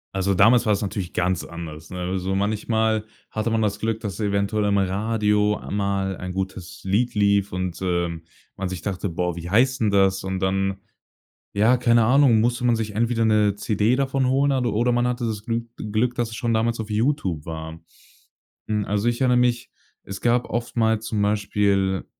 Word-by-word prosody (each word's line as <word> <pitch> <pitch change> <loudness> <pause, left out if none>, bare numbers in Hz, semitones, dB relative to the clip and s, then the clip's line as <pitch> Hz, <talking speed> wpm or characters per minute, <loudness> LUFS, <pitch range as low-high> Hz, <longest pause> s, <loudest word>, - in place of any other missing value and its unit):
Also, 95 +1 +1
damals 115 +6 +5
war 105 - +3
es 100 - -1
natürlich 100 -3 -4
ganz 90 0 0
anders, 80 -1 -9
ne? 90 - -6
Also, 95 +1 -2
manchmal 110 +2 0 0.2
hatte 110 +1 -2
man 115 0 +1
das 105 -1 -1
Glück, 110 0 -2
dass 100 -2 -5
eventuell 100 0 0
am 100 0 +2
Radio 105 +2 +1
mal 100 -2 -1
ein 90 0 -6
gutes 95 -1 -5
Lied 105 +6 0
lief 100 -1 +2
und, 90 -1 -3
äh, 85 -2 0 0.5
man 95 - -2
sich 90 -2 -5
dachte: 100 0 -3
„Boah, 90 -1 -2
wie 85 0 -6
heißt 130 +6 +3
'n 110 - +3
das?“ 95 -1 +2
Und 95 0 -2
dann, 95 0 0 0.8
ja, 110 +5 +4
keine 120 -2 +4
Ahnung, 125 -2 +5
musste 120 +2 0
man 120 -1 +3
sich 110 -2 -4
entweder 115 +1 +1
'ne 105 -2 +3
CD 105 +3 +1
davon 135 -1 0
holen 140 +2 +2
a 135 - +1
oder 120 +1 +1
man 120 0 +2
hatte 125 0 -2
das 110 -2 -3
Glü 115 0 -1 0.2
Glück, 110 +3 -1
dass 120 -2 -1
es 110 - -8
schon 120 -1 -1
damals 115 +1 +1
auf 110 -1 -5
YouTube 105 - -1
war. 80 0 -7 0.9
Hm, 105 -1 -1
also 105 +2 -1
ich 120 +2 0
erinnere 125 -1 +4
mich, 120 -1 +1 0.3
es 100 0 -8
gab 120 +1 +1
oftmals 110 -1 0
zum 110 -2 -1
Beispiel, 100 -2 +1
105 Hz, 190 wpm, -23 LUFS, 95-115 Hz, 0.9 s, damals